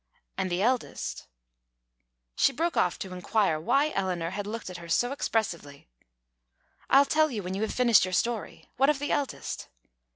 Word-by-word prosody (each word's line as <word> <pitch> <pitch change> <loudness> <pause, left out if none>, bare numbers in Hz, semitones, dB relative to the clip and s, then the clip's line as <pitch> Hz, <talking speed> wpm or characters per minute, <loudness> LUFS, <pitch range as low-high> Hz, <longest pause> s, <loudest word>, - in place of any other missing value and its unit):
And 190 -1 -1
the 180 +2 0
eldest 250 +1 -1 0.6
" - - -52
She - - +5
broke 335 +5 -1
off 180 - +2
to 190 -1 -6
inquire 180 -2 +1
why 280 - +2
Eleanor 180 - -2
had 205 +1 -4
looked 220 -3 -5
at 180 - -7
her 170 0 -10
so 245 +9 +2
expressively. 175 - -3 1.0
"I'll 275 +1 +6
tell 310 +2 +3
you 215 -7 -4
when 180 +1 -4
you 195 - -3
have 220 - -1
finished 240 -4 +5
your 185 0 -2
story. 230 +2 -2
What 270 +3 +4
of 300 - +2
the 290 +1 -3
eldest?" 285 -2 -3
200 Hz, 175 wpm, -28 LUFS, 175-250 Hz, 1.0 s, I'll